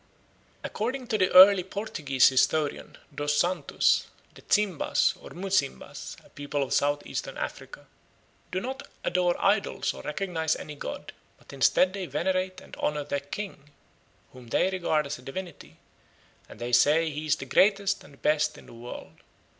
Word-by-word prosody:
According 250 +4 -3
to 215 -3 0
the 185 - +3
early 190 0 +9
Portuguese 160 - +1
historian, 145 +3 0 0.2
Dos 145 +1 -1
Santos, 180 +3 +2 0.3
the - - -15
Zimbas, 205 -7 +1
or - - -11
Muzimbas, 185 - -3
a - - -19
people 145 0 -3
of 135 - -3
South 145 +1 +1
eastern - - -5
Africa, - - -7 0.7
"do 185 - -1
not 260 +6 -5 0.2
adore 180 -1 +1
idols 200 +1 +1
or - - -9
recognize 160 -1 -1
any 150 - -8
god, 145 - -7 0.2
but - - -16
instead 160 +7 +3
they 195 -3 -4
venerate 185 +5 -1
and - - -12
honour 150 0 -1
their 140 0 -2
king, 150 +1 -7 0.6
whom 125 -2 -13
they 185 +10 +1
regard 165 -5 0
as 140 -1 -5
a - - -13
divinity, 135 - -8 0.7
and - - -12
they 120 +1 -5
say 155 +6 +4
he 150 +1 -5
is 150 - +3
the - - -8
greatest 200 +7 +2
and 140 - -18
best 150 0 +2
in - - -14
the - - -14
world. 120 +1 -10
160 Hz, 160 wpm, -27 LUFS, 145-190 Hz, 0.7 s, early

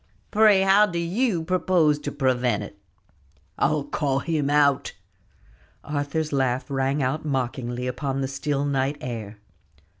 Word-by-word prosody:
"Pray, 210 -2 +5
how 200 +2 +5
do 170 -3 -4
you 175 +2 0
propose 175 -4 +2
to 145 0 -5
prevent 125 -6 0
it?" 100 - -10 0.8
"I'll 150 0 +1
call 140 -2 -1
him 150 -1 -1
out." 140 -1 +2 0.9
Arthur's 150 +1 -2
laugh 130 -2 0
rang 135 +1 0
out 135 +5 -1
mockingly 125 -3 -3
upon 135 +2 -2
the 135 - -1
still 140 +1 -2
night 140 0 0
air. 110 -4 -6
140 Hz, 130 wpm, -24 LUFS, 130-160 Hz, 0.9 s, Pray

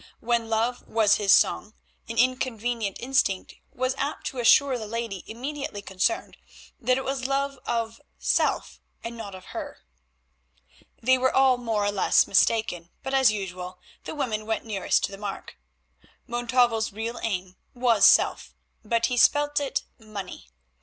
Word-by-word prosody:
When 235 -1 0
love 230 +2 -1
was 220 -2 +3
his 205 -2 +2
song 210 +2 +3 0.3
an 230 - -5
inconvenient 240 -4 0
instinct 245 -7 0 0.2
was 255 +1 -1
apt 285 +2 -3
to 265 - -4
assure 255 +3 +5
the 215 - -6
lady 225 -4 -4
immediately 255 -3 -5
concerned 195 - -1 0.4
that 255 -1 +2
it 265 - -4
was 265 -1 -2
love 275 0 -1
of 230 -1 -2 0.2
self - - 0 0.2
and 235 0 -6
not 205 -4 -7
of 185 - -12
her. - - -6 1.3
They 260 +2 +4
were 260 +1 +2
all 265 -1 +4
more 225 -4 -1
or 205 - +1
less 200 - +3
mistaken, 195 -4 +1
but, 265 - -4
as 265 -4 +5
usual, 180 -3 -6 0.3
the - - -6
women 220 -7 -2
went 225 +1 -2
nearest 205 -4 0
to - - -1
the 195 - -9
mark. 195 - -7 0.7
Montalvo's 240 -2 +1
real 225 +3 -5
aim 185 -4 -3 0.2
was 240 -3 +5
self, - - +3 0.3
but 230 +2 +1
he 250 0 -1
spelt 290 +4 +4
it, 280 -2 -2 0.2
Money. 205 - -8
230 Hz, 155 wpm, -26 LUFS, 205-255 Hz, 1.3 s, assure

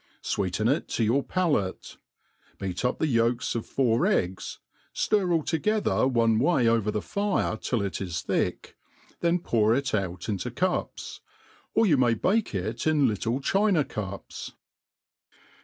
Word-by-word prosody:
Sweeten 100 +2 -1
it 140 +6 +1
to 115 - -1
your 120 +6 +2
palate; 145 - -1 0.6
beat 95 0 -4
up 125 - +1
the - - 0
ydks 115 -3 +1
of 115 - -3
four 125 +5 +2
eggs, 95 - -1 0.4
ftir 195 -4 +1
all 165 -2 +2
together 205 -2 +1
one 115 -3 +2
way 135 -3 +3
over 115 -2 +2
the 105 0 -2
fire 200 - 0
till 110 0 -2
it 100 - -3
is 85 -4 -3
thick, - - -2 0.4
then 170 +1 +2
pcur 115 -8 +2
it 135 -2 -2
out 95 -3 -2
into 105 +3 -2
cups. 180 +9 -2 0.5
Or 225 - +5
you 160 -8 +4
may 120 -3 +3
bake 200 - 0
it 110 - -2
in 150 -4 +4
litle 115 +4 -1
china 195 -1 +2
cups. 100 -6 -6
120 Hz, 150 wpm, -27 LUFS, 105-165 Hz, 0.6 s, Or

